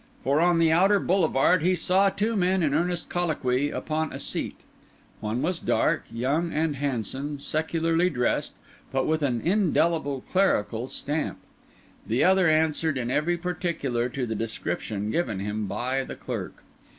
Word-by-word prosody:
For 140 +3 +2
on 175 0 +4
the 165 -1 +4
outer 195 +5 +4
boulevard 175 -2 +3
he 180 +3 +2
saw 185 +3 +3
two 215 +4 -1
men 185 -1 +2
in 145 -3 +1
earnest 175 +2 0
colloquy 145 -6 0
upon 155 +1 -2
a - - -5
seat. - - -3 0.6
One 110 +5 -2
was 175 +2 0
dark, - - +1
young, 140 +9 0
and 155 -1 0
handsome, 140 +2 -3
secularly 165 +3 +1
dressed, 125 -7 -1 0.4
but 135 0 0
with 160 0 0
an 125 -5 0
indelible 165 -7 +1
clerical 125 - 0
stamp; 150 +3 -2 0.7
the 115 +3 +1
other 185 -2 +4
answered 155 -1 +2
in 120 -1 -2
every 170 +6 +1
particular 165 -9 -2
to 130 0 -3
the 110 - -3
description 110 -1 -3
given 115 - -1
him 105 +1 -3
by 130 +6 -1
the - - -7
clerk. - - -6
155 Hz, 150 wpm, -26 LUFS, 130-175 Hz, 0.7 s, on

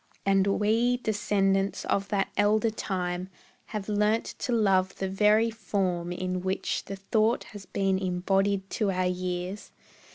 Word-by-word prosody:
And 195 0 +3
we, 230 +4 +2
descendants 200 -4 0
of 200 0 0
that 200 -2 0
elder 215 +2 +3
time, 180 -3 -3 0.4
Have 210 -3 -5
learnt 210 +1 +1
to - - -2
love 195 -5 +2
the 195 - -2
very 210 +4 +3
form 185 -5 -2
in 185 0 -2
which 190 +1 -2
The 195 - -5
thought 215 +4 +1
has 200 -3 -10
been 195 -1 0
embodied 195 +1 0
to 210 -3 0
our 185 -1 0
years. 180 +2 -3
195 Hz, 140 wpm, -28 LUFS, 185-210 Hz, 0.4 s, And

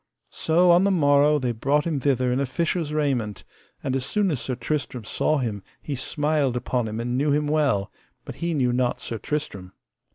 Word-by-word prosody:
So 175 +2 +3
on 175 +2 +5
the 200 - +3
morrow 145 -4 +4
they 125 -4 -1
brought 140 +6 +1
him 160 -4 -1
thither 130 -2 +1
in 130 - 0
a 140 - 0
fisher's 165 +2 -1
raiment; 135 -9 -1 0.4
and 130 - -1
as 135 - -1
soon 195 +7 0
as 140 - -2
Sir 130 - -2
Tristram 125 -1 -3
saw 155 +8 0
him 110 -7 -2 0.2
he 145 - -5
smiled 145 -1 0
upon 125 -1 -1
him 110 +1 -4
and 120 +1 -2
knew 145 +2 +1
him 150 +1 +1
well, 145 -10 +1 0.3
but - - -7
he 170 -1 -1
knew 125 -4 +1
not 125 0 0
Sir 115 - -5
Tristram. 100 -12 -4
140 Hz, 200 wpm, -24 LUFS, 125-150 Hz, 0.4 s, on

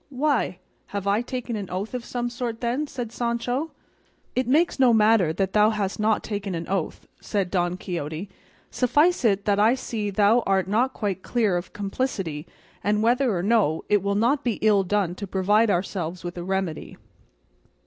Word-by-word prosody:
"Why! 275 -8 0 0.3
have 200 -1 -4
I 200 +3 +2
taken 245 -1 -4
an 200 -3 -5
oath 195 +6 -4
of 250 -2 -3
some 240 0 -3
sort, 240 -2 -4
then?" 250 +5 -1
said 245 -5 -5
Sancho. 245 +5 -2 0.7
"It 255 -1 0
makes 310 +4 +2
no 250 -3 +5
matter 215 -6 +4
that 190 +3 -1
thou 210 0 +5
hast 205 -3 -2
not 215 0 +2
taken 205 -3 -4
an 165 0 -5
oath," 190 -3 -3 0.2
said 195 -4 -2
Don 175 -1 0
Quixote; 170 0 -5 0.4
"suffice 295 +7 +2
it 200 -3 +2
that 205 -1 +2
I 220 +4 +5
see 225 -5 -3
thou 210 +3 +4
art 190 -2 +2
not 235 +6 +1
quite 200 -3 -3
clear 220 -5 +1
of 175 +1 -4
complicity; 195 - -3 0.4
and 210 +1 +1
whether 240 -2 +2
or 175 - -2
no, 200 -7 +2
it 205 -1 +3
will 200 +1 -1
not 250 +7 +2
be 240 - +1
ill 210 -2 +5
done 195 -2 0
to 200 +2 -7
provide 205 +4 +2
ourselves 175 -2 -2
with 175 0 -5
a 175 - -5
remedy." 190 -3 -3
210 Hz, 180 wpm, -24 LUFS, 190-240 Hz, 0.7 s, no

